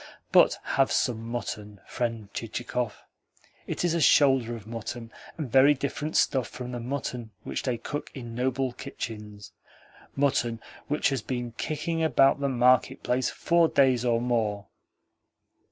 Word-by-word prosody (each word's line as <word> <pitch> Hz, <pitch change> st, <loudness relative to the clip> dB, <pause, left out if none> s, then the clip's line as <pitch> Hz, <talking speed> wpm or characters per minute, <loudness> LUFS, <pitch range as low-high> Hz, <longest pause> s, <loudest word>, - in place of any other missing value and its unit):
But -, -, +6 dB
have 135 Hz, -1 st, +1 dB
some 115 Hz, -2 st, 0 dB
mutton, 105 Hz, -4 st, -5 dB
friend 115 Hz, -4 st, -3 dB
Chichikov. 120 Hz, 0 st, -4 dB, 0.6 s
It -, -, -2 dB
is 170 Hz, -2 st, +2 dB
shoulder 130 Hz, -5 st, +4 dB
of 110 Hz, -3 st, -10 dB
mutton, 115 Hz, +1 st, -6 dB, 0.3 s
and 145 Hz, -7 st, -4 dB
very 135 Hz, +4 st, +6 dB
different 145 Hz, +3 st, -2 dB
stuff 130 Hz, -4 st, +2 dB
from 125 Hz, -1 st, -7 dB
the 120 Hz, -, -4 dB
mutton 125 Hz, -2 st, -4 dB
which -, -, -3 dB
they 125 Hz, -3 st, -1 dB
cook 145 Hz, +5 st, -5 dB
in 120 Hz, -4 st, -7 dB
noble 130 Hz, +1 st, -1 dB
kitchens 105 Hz, -6 st, -7 dB, 0.6 s
mutton 120 Hz, -5 st, +1 dB, 0.3 s
which 150 Hz, 0 st, +1 dB
has 135 Hz, -4 st, -1 dB
been 120 Hz, +1 st, -4 dB
kicking 160 Hz, +6 st, -2 dB
about 135 Hz, -3 st, +4 dB
the 140 Hz, -1 st, 0 dB
market 130 Hz, +1 st, +3 dB
place 125 Hz, 0 st, +1 dB
four 170 Hz, -1 st, +3 dB
days 130 Hz, -5 st, +3 dB
or 120 Hz, -2 st, +2 dB
more. 110 Hz, -4 st, -1 dB
125 Hz, 140 wpm, -27 LUFS, 115-135 Hz, 0.6 s, But